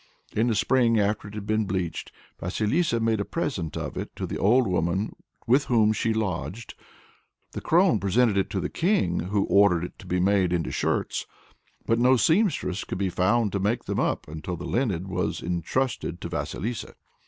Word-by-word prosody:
In 110 +3 +2
the 115 - +1
spring, 115 0 +3
after 105 +1 0
it 100 - -10
had 105 -1 -5
been 110 0 +1
bleached, 90 -4 -3 0.3
Vasilissa 110 - 0
made 115 -1 +1
a - - 0
present 100 - -3
of - - -5
it - - -6
to - - -4
the - - -5
old 120 +4 +4
woman 90 +3 -1 0.3
with 130 +5 +3
whom 110 -3 +3
she 110 +1 0
lodged. 110 +1 -3 0.8
The - - -6
crone 175 - +3
presented 100 +3 +2
it 95 - +1
to 95 - -2
the - - -2
king, 165 - +1
who 100 +3 0
ordered 100 -4 +4
it 90 - -8
to - - -12
be 90 - 0
made 95 -1 +2
into 85 -2 -1
shirts. - - -1 0.6
But 115 0 +2
no 130 +2 +5
seamstress 160 - +1
could - - -5
be 95 0 0
found 105 +5 +2
to 100 - -1
make 105 +5 0
them - - -2
up, - - -1
until 80 +4 -5
the 85 - -7
linen 100 -8 -1
was 90 -1 -2
entrusted 90 +2 -2
to - - -5
Vasilissa. 115 +4 -4
105 Hz, 190 wpm, -26 LUFS, 90-120 Hz, 0.8 s, no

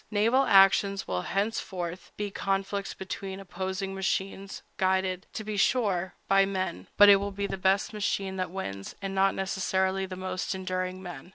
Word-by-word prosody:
Naval 230 +6 +3
actions 195 0 +5
will 90 -1 -1
henceforth 185 - -3
be 205 -1 -3
conflicts 195 +1 -2
between 190 0 -6
opposing 190 +1 -4
machines, 195 0 -3
guided, 190 -1 0
to 215 - -4
be 210 -1 -4
sure, 195 -5 +1
by 195 0 +5
men; 185 - -3
but 205 - +9
it 200 -1 +9
will 200 +1 -2
be 200 0 -3
the 195 - -3
best 190 +3 +1
machine 200 -2 -1
that 185 -2 -2
wins, 100 - -6
and 195 -1 -4
not 195 0 +3
necessarily 190 0 0
the 185 - -6
most 185 0 -3
enduring 185 0 -3
men. 175 -3 -8
190 Hz, 165 wpm, -28 LUFS, 185-195 Hz, -, but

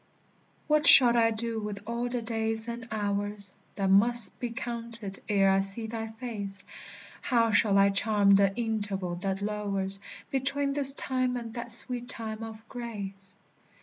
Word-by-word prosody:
What 300 -1 +1
shall 240 -2 +8
I 230 -1 +3
do 225 0 -4
with 210 -1 -7
all 235 +1 -3
the 245 -1 -4
days 225 0 -2
and 235 -1 -7
hours 205 -1 -3 0.2
That 195 -1 -1
must 230 +3 +5
be 245 - -4
counted 230 -4 -7
ere 195 -2 +3
I 195 - +2
see 195 +4 +3
thy 225 0 -5
face? 220 -4 -7 0.6
How 230 -3 +1
shall 205 -1 +2
I 200 0 +4
charm 200 0 +2
the 195 0 +4
interval 205 -6 -3
that 195 +2 -4
lowers 200 -2 -2 0.3
Between 275 +1 -1
this 275 -1 +6
time 255 -2 -2
and 230 -2 -8
that 235 0 -7
sweet 245 +1 +3
time 220 -1 -7
of 225 0 -10
grace? 200 -6 -8
220 Hz, 155 wpm, -27 LUFS, 200-235 Hz, 0.6 s, shall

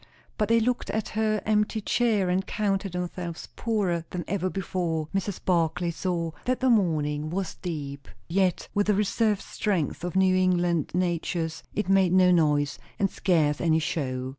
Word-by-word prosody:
But 210 - +1
they 230 0 +5
looked 245 +2 -1
at 220 -1 -2
her 215 -1 0
empty 210 +1 +1
chair, 215 -3 +1
and 180 +2 +1
counted 195 -3 -1
themselves 180 -1 -5
poorer 195 -8 0
than 175 -2 -4
ever 185 -1 -1
before. 175 -4 -2
Mrs. 195 0 -2
Barclay 170 -1 +1
saw 170 -1 -2
that 255 0 0
the 260 -1 +3
mourning 155 -7 +1
was 185 +1 -3
deep. 145 -5 -6 0.2
Yet, 185 +1 +1
with 205 0 +1
the 210 - +3
reserved 210 0 +1
strength 180 -7 -2
of 180 +1 -4
New 190 -1 +4
England 175 -3 +2
natures, 170 -2 -1
it 210 - -1
made 190 -2 +4
no 185 -1 +6
noise, 150 -4 +2 0.2
and 195 -1 +1
scarce 155 -5 +1
any 160 -2 +3
show. 130 -5 -2
180 Hz, 165 wpm, -26 LUFS, 165-200 Hz, 0.2 s, no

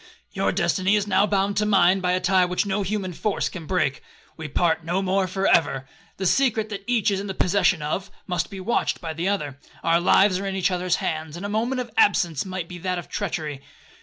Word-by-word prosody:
Your - - 0
destiny 195 +1 +1
is 205 -1 +1
now 200 0 +3
bound 200 0 0
to 210 - +3
mine 190 -2 +4
by 180 -1 0
a 185 - +1
tie 185 0 +3
which 180 +3 -1
no 200 +1 -1
human 195 -2 -2
force 210 +5 -1
can 165 -4 -8
break,—we 155 -1 -3
part 160 +2 +1
no 175 +3 -1
more 190 0 +1
for 190 +2 -2
ever. 135 -7 +2 0.3
The 190 - -3
secret 220 0 +2
that 200 -2 -6
each 230 -4 +2
is 195 - 0
in 200 0 -4
possession 180 -3 +2
of, 170 +6 -3 0.2
must 175 -2 -2
be 195 - -8
watched 195 +6 0
by 165 -3 -5
the 165 +3 -2
other. 145 -9 -3 0.2
Our 165 0 +3
lives 190 +1 +4
are 200 - -4
in 195 - -3
each 190 0 +1
other's 180 0 0
hands, 155 0 -3
and 190 - -6
a - - -3
moment 235 +5 -1
of 245 - -8
absence 175 - +3
might 185 -3 -5
be 175 0 -9
that 180 +1 -2
of 175 - -7
treachery. 155 -9 -3
185 Hz, 225 wpm, -24 LUFS, 170-200 Hz, 0.3 s, mine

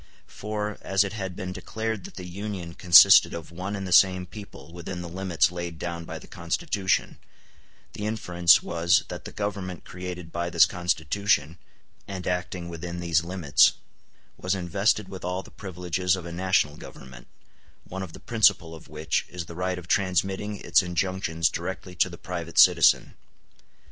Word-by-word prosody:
For, 105 0 -5
as 95 +1 +2
it 100 0 -5
had 95 -4 -5
been 90 0 -5
declared 110 -1 -4
that - - -11
the 90 - -7
Union 90 -2 -6
consisted 85 -2 +7
of 85 -1 -8
one 95 +4 -5
and 100 -1 -5
the - - -6
same 95 0 +5
people 90 -5 -12
within 90 +1 -6
the - - -6
limits 90 -1 0
laid 85 -2 -5
down 85 0 -5
by - - -6
the - - -12
Constitution, 95 - -2 0.7
the 105 - -4
inference 90 -6 +3
was 85 +5 +2
that 90 - -7
the - - -7
Government 100 -4 -5
created 90 -2 -7
by 85 0 -2
this 85 -1 +6
Constitution, 85 -1 0 0.5
and 95 -2 -6
acting 90 -1 -3
within 85 +1 -6
these 85 -2 +1
limits, 85 -5 +3 0.6
was 95 +1 -1
invested 95 +3 0
with 95 -1 -9
all 90 +1 -3
the - - -15
privileges 90 -1 -2
of 90 -2 -8
a 85 - -7
national 85 -4 +1
government, 65 -2 -12 0.6
one 95 +1 -7
of 90 -4 -7
the - - -11
principal 110 -8 +2
of 80 - -12
which 75 +1 -2
is 90 -2 -6
the 85 - -10
right 90 +1 -2
of 90 -2 -9
transmitting 95 +2 0
its 85 -1 +3
injunctions 90 -2 -1
directly 90 +1 -5
to 90 +1 +1
the 85 - -10
private 85 -3 -6
citizen. - - +5
90 Hz, 170 wpm, -26 LUFS, 85-95 Hz, 0.7 s, consisted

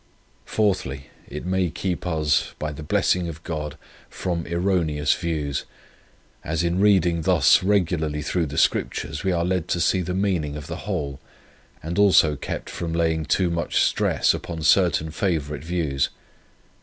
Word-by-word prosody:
4, 105 -3 +2 0.5
It 75 +4 -7
may 95 -1 +1
keep 90 +2 -3
us, 75 -3 +1
by 75 0 -3
the 75 - -8
blessing 85 +3 +1
of 80 0 -8
God, 75 -2 -4 0.3
from 85 -3 -3
erroneous 85 -4 +1
views, 75 -5 -2 0.8
as 80 +2 -1
in 85 +1 0
reading 90 -5 +3
thus - - +5
regularly 85 -6 0
through 85 +1 0
the 70 - -6
Scriptures 75 +3 0
we 95 - +1
are 85 -1 0
led 90 -2 -1
to 85 - -1
see 95 +2 +2
the 90 +1 -3
meaning 90 -7 0
of 75 - -7
the 85 +5 -7
whole, 70 -8 -3 0.6
and 85 +4 -3
also 90 -7 +5
kept - - -5
from 85 -1 -4
laying 80 -1 +1
too 90 0 +1
much 85 -1 0
stress - - +2
upon 80 -2 -5
certain 80 -3 +3
favourite 75 -5 -2
views. 80 -5 -1
85 Hz, 155 wpm, -23 LUFS, 75-90 Hz, 0.8 s, thus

